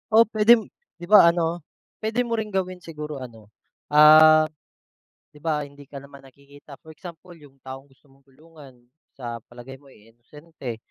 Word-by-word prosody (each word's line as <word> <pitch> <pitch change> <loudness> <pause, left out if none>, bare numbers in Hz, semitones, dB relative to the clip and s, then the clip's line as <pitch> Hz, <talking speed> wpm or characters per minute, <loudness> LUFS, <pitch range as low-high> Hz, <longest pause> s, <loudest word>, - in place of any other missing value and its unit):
O 225 - +7
pwede 220 +1 +4 0.3
'di 175 - -16
ba 210 -5 +8
ano, 170 0 -1 0.4
pwede 220 +3 -2
mo 230 -2 -3
ring 215 - -4
gawin 185 -1 -4
siguro 150 -4 -9
ano, 115 -4 -13 0.4
ah, 155 +1 +6 0.9
'di 150 - -19
ba, 150 -2 -2
hindi 140 0 -17
ka 140 - -10
naman 140 0 -14
nakikita. 140 +1 -17
For 160 - -16
example, 175 +2 -13
yung 145 -5 -19
taong 135 +1 -11
gusto 135 +2 -30
mong 135 0 -27
tulungan, 150 -1 -18 0.4
sa 120 -3 -8
palagay 130 +3 -13
mo 140 - -20
eh, 115 -2 -22
inosente. 135 0 -11
150 Hz, 165 wpm, -22 LUFS, 135-170 Hz, 0.9 s, ba